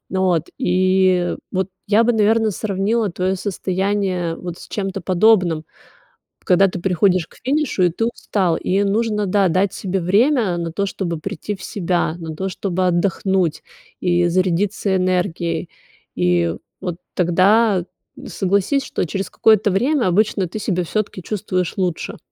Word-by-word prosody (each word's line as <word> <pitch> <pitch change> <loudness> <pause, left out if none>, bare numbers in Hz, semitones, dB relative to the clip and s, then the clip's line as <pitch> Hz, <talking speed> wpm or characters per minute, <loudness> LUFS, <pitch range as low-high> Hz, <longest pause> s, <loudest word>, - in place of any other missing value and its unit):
От, 180 -4 +1
и 185 0 +2 0.2
вот 190 0 -1 0.2
я 215 +2 +4
бы 240 +1 +2
наверное 220 0 +3
сравнила 205 +2 -1
твое 185 +2 -1
состояние 190 -2 -1
вот 175 -1 -7
с - - -11
чем-то 195 -2 -3
подобным, 185 -4 +3 0.8
когда 190 +2 +5
ты 180 - -5
приходишь 185 -1 +2
к - - -20
финишу 285 -7 0
и 180 - +4
ты 225 +7 -1
устал, 190 -7 -1
и 195 +2 0
нужно, 210 0 0
да, 195 +1 +3
дать 185 +3 +1
себе 190 -1 -2
время 205 - +2
на 170 -1 -3
то, 200 +4 -1
чтобы 170 -4 -3
прийти 160 +6 -5
в 190 - -15
себя, 175 -4 -1
на 160 -2 -7
то, 190 +4 -3
чтобы 185 0 -1
отдохнуть 180 -1 0 0.4
и 175 -1 +2
зарядиться 185 +3 0
энергией. 180 -2 -1 0.5
И 85 -2 +1 0.3
вот 175 -2 -3 0.2
тогда, 190 +2 +3 0.4
согласись, 200 +9 0
что - - -2
через 195 +4 -4
какое-то 215 -1 +3
время 250 +5 +1
обычно 195 0 +1
ты 180 - -7
себя 180 -3 -1
всё-таки 205 +1 -3
чувствуешь 185 -4 -2
лучше. 180 -4 -2
190 Hz, 145 wpm, -20 LUFS, 175-205 Hz, 0.8 s, когда